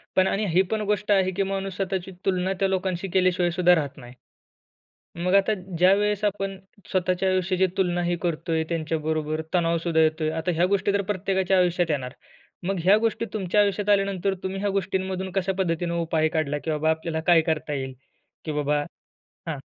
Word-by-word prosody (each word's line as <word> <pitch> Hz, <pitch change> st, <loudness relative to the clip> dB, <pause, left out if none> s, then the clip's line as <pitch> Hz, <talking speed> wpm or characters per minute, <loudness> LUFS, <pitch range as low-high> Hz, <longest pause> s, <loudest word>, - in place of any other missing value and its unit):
पण 185 Hz, 0 st, +4 dB
आणि 205 Hz, +2 st, 0 dB
ही 175 Hz, +3 st, +4 dB
पण 220 Hz, -1 st, 0 dB
गोष्ट 210 Hz, 0 st, -1 dB
आहे, 190 Hz, -2 st, +3 dB
की 195 Hz, +2 st, 0 dB
माणूस 195 Hz, -1 st, -3 dB
स्वतःची 190 Hz, -1 st, -3 dB
तुलना 185 Hz, 0 st, +1 dB
त्या 195 Hz, -, +3 dB
लोकांशी 190 Hz, -1 st, -1 dB
केल्याशिवायसुद्धा 180 Hz, -1 st, +3 dB
राहत 145 Hz, -4 st, -3 dB
नाही. 120 Hz, -2 st, -11 dB, 1.1 s
मग 180 Hz, +1 st, +2 dB
आता 200 Hz, +2 st, +4 dB, 0.2 s
ज्यावेळेस 200 Hz, +3 st, +3 dB
आपण 195 Hz, -1 st, -1 dB, 0.3 s
स्वतःच्या 185 Hz, 0 st, +1 dB
आयुष्याची 185 Hz, 0 st, +2 dB
तुलना 175 Hz, -2 st, +1 dB
ही 175 Hz, 0 st, 0 dB
करतोय 165 Hz, -1 st, -1 dB
त्यांच्याबरोबर 155 Hz, -1 st, -2 dB
तणावसुद्धा 170 Hz, -1 st, +1 dB
येतोय. 155 Hz, 0 st, +1 dB
आता 160 Hz, +2 st, -2 dB
ह्या 170 Hz, +2 st, +3 dB
गोष्टी 200 Hz, +1 st, +1 dB
तर 200 Hz, 0 st, +1 dB
प्रत्येकाच्या 190 Hz, 0 st, +1 dB
आयुष्यात 175 Hz, -1 st, +2 dB
येणार. 130 Hz, -4 st, -2 dB, 0.5 s
मग 195 Hz, 0 st, -1 dB
ह्या 190 Hz, +4 st, +6 dB
गोष्टी 225 Hz, +1 st, 0 dB
तुमच्या 205 Hz, -1 st, +1 dB
आयुष्यात 205 Hz, 0 st, +1 dB
आल्यानंतर 195 Hz, -1 st, +1 dB
तुम्ही 190 Hz, +1 st, -3 dB
ह्या 205 Hz, 0 st, 0 dB
गोष्टींमधून 190 Hz, -1 st, -2 dB
कशापद्धतीने 180 Hz, -3 st, -1 dB
उपाय 160 Hz, -1 st, +1 dB
काढला, 155 Hz, -2 st, -1 dB
की 160 Hz, -, -4 dB
बाबा 155 Hz, +1 st, +1 dB
आपल्याला 160 Hz, 0 st, -2 dB
काय 175 Hz, -2 st, +6 dB
करता 155 Hz, -1 st, -2 dB
येईल, 130 Hz, -1 st, -4 dB, 0.5 s
की 155 Hz, -, -3 dB
बाबा? 150 Hz, 0 st, 0 dB, 0.6 s
हां. 155 Hz, -3 st, -3 dB
180 Hz, 165 wpm, -25 LUFS, 160-195 Hz, 1.1 s, ह्या